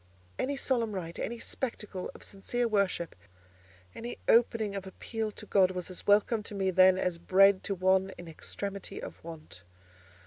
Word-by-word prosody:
Any 280 +2 -1
solemn 235 -5 0
rite, 170 -3 -5
any 235 - -3
spectacle 210 -6 -4
of - - -12
sincere 235 +5 -2
worship, 200 -6 0 0.8
any 240 +1 -6
opening 225 -3 +3
for 190 - -9
appeal 220 +3 -4
to 210 - -9
God 190 -3 +4
was 185 0 -5
as 180 - -8
welcome 210 +2 +4
to 205 - -7
me 190 -1 +1
then 185 0 +6
as 180 -2 -1
bread 195 +2 +5
to 195 - -1
one 190 +1 +3
in 175 - -9
extremity 200 +4 -6
of - - -9
want. 155 - -10
195 Hz, 165 wpm, -30 LUFS, 185-220 Hz, 0.8 s, then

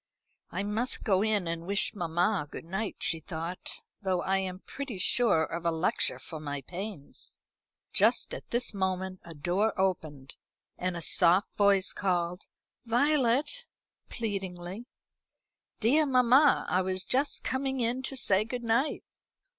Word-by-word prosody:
"I 185 +3 -3
must 220 +5 -1
go 195 -3 +3
in 210 -4 +1
and 165 +1 -4
wish 200 +2 +3
mamma 175 -1 0
good - - -8
night," 195 +5 -3
she 165 - +1
thought; 165 +2 -6 0.2
"though 185 -3 0
I 195 0 +1
am 185 0 -4
pretty 275 -7 -6
sure 200 -3 +3
of 170 +1 -4
a 170 - +2
lecture 165 +1 0
for 160 - -8
my 145 -2 -4
pains." 180 - -8 0.6
Just - - +3
at - - -8
this 240 -1 -1
moment 190 -1 -2
a 165 -1 -11
door 185 +8 0
opened, 155 -8 -2 0.4
and 180 -1 -2
a 170 - -5
soft 180 +4 +3
voice 200 -2 +3
called 180 -1 -1 0.4
"Violet," 280 - +1 0.4
pleadingly. 195 -1 -5 0.9
"Dear 295 +7 +3
mamma, 260 +2 +5
I 185 - +2
was 185 0 -2
just 275 +3 0
coming 265 0 -1
in 240 +2 0
to 265 +1 -4
say 200 -4 +4
good 240 +2 -5
night." 235 +6 +1
195 Hz, 145 wpm, -29 LUFS, 175-235 Hz, 0.9 s, mamma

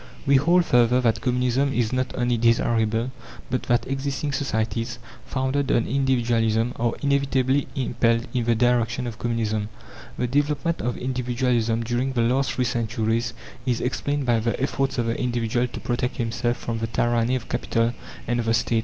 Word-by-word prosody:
We 140 -1 +5
hold 170 +5 +4
further 125 -1 +4
that 115 -3 +1
Communism 125 +2 +1
is 120 -2 0
not 130 0 0
only 120 -1 +1
desirable, 115 0 +2 0.4
but 130 - 0
that 120 0 +2
existing 135 +1 -2
societies, 115 -3 -2 0.3
founded 130 +1 0
on 115 - +2
Individualism, 120 -3 +1
are 120 0 0
inevitably 140 -1 +2
impelled 115 -3 +1
in 125 -3 0
the 120 0 +3
direction 120 0 +1
of 120 -1 -6
Communism. 110 -3 -1 0.5
The 125 - 0
development 145 +5 0
of 120 0 -2
Individualism 125 -2 0
during 125 +3 -1
the 120 - +1
last 125 +2 +1
three 125 - 0
centuries 115 0 -1 0.3
is 120 -2 +1
explained 145 +3 -1
by 120 -2 +3
the 115 +1 -1
efforts 135 0 -1
of 120 - +1
the 115 0 0
individual 120 0 0
to 120 - -8
protect 120 +3 -2
himself 120 +1 -1
from 115 -1 -4
the 115 - -2
tyranny 120 +1 +1
of 125 - -4
Capital 115 +1 0 0.3
and 120 +1 0
of 115 - -2
the 115 - +3
State. 115 0 +1
120 Hz, 170 wpm, -24 LUFS, 115-130 Hz, 0.5 s, We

